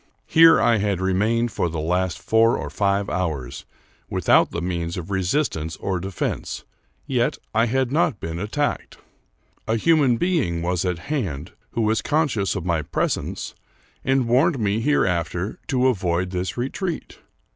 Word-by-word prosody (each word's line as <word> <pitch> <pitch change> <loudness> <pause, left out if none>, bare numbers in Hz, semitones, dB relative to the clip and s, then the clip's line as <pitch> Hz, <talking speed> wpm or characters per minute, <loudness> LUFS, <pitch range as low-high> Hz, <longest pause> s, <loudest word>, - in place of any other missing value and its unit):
Here 165 0 +7
I 115 - +4
had 100 -3 0
remained 110 +5 +1
for 90 - -1
the 80 -1 -4
last 90 +3 0
four 115 +1 +3
or - - -5
five 100 0 +1
hours, 80 -9 -3 0.4
with - - -3
out - - +6
the 85 - -4
means 85 -1 -3
of 90 +2 -6
resistance 95 - -1
or 95 -2 -2
defense; 95 0 -4 0.4
yet 125 -4 0 0.2
I 115 +2 +3
had 130 +1 0
not 155 - +1
been 80 +1 -5
attacked. 140 +9 -2 0.7
A 110 - +1
human 140 -3 +3
being 125 - 0
was 90 +1 0
at 90 -2 0 0.2
hand, 90 - -3 0.2
who 115 - 0
was 110 0 +1
conscious 145 -12 0
of 95 -3 -4
my 85 -3 +1
presence, 75 +1 -2 0.5
and 135 -2 +2
warned 130 +6 +3
me 105 -2 0
hereafter 95 - 0
to 130 -2 +1
avoid 90 -7 +1
this 90 +3 -3
re 125 +3 -2
treat. 180 -4 -5
100 Hz, 155 wpm, -23 LUFS, 90-130 Hz, 0.7 s, Here